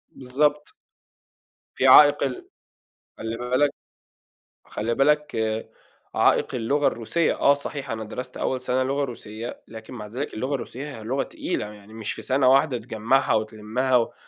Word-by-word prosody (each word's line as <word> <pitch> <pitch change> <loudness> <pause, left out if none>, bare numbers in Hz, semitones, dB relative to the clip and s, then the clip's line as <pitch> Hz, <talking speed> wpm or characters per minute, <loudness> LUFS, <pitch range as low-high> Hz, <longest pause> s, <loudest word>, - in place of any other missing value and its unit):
بالضبط. 145 +3 0 1.0
في 135 - +2
عائق 145 +2 +8
ال 130 -2 -3 0.7
خلّي 115 +1 -4
بالك 130 +4 +1 0.9
خلّي 115 +2 -2
بالك 150 +2 +2 0.8
عائق 130 - +3
اللغة 140 +5 +1
الروسية، 155 +9 0
آه، 140 - +6
صحيح 140 -1 -5
أنا 110 -1 -3
درست 125 +4 -7
أول 130 -1 -1
سنة 130 +1 0
لغة 140 +2 0
روسية، 115 -2 -7
لكن 110 +1 -10
مع 105 -4 -7
ذلك 125 +7 -5
اللغة 130 +6 -2
الروسية 135 +2 -6
هي 110 - -10
لغة 130 +5 -1
تقيلة، - - -4
يعني 105 +1 -15
مش 110 0 -4
في - - -8
سنة 130 0 +2
واحدة 135 0 +4
تجمّعها 115 +3 +1
وتلمّها 110 +4 0
و 115 - -1
125 Hz, 145 wpm, -24 LUFS, 115-140 Hz, 1.0 s, عائق